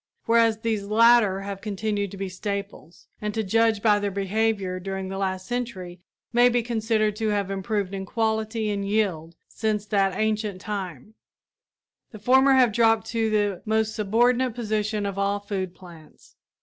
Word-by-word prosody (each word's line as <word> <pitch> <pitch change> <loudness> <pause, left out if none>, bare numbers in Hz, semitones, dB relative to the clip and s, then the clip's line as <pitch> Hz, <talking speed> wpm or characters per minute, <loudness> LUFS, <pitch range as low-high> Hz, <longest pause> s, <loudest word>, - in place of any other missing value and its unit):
Whereas 230 -1 +3
these 220 -3 -1
latter 215 -2 +4
have 195 0 -6
continued 205 -1 -2
to 195 - -10
be 195 0 -3
staples, 195 -2 -6 0.2
and 210 -1 -3
to 220 - 0
judge 220 +1 +2
by 210 -2 +4
their 205 0 -1
behavior 200 -1 -1
during 190 0 -5
the 195 - -5
last 190 -1 -2
century 190 -7 -5 0.3
may 240 +1 +6
be 245 -1 +1
considered 220 -2 0
to 220 -1 -1
have 200 -2 -1
improved 195 0 -2
in 190 -1 -5
quality 220 0 -1
and 200 -1 -2
yield 190 -6 -1
since 215 -2 -2
that 195 -3 +1
ancient 215 -3 -1
time, 195 - -6 1.0
the 215 - -11
former 265 +5 +4
have 250 -4 +4
dropped 225 -1 +3
to 225 -1 0
the 205 -3 0
most 220 0 0
subordinate 240 +4 +1
position 215 -2 -1
of 200 -1 -3
all 200 +1 0
food 190 -3 -4
plants. 170 -4 -16
210 Hz, 160 wpm, -25 LUFS, 195-225 Hz, 1.0 s, may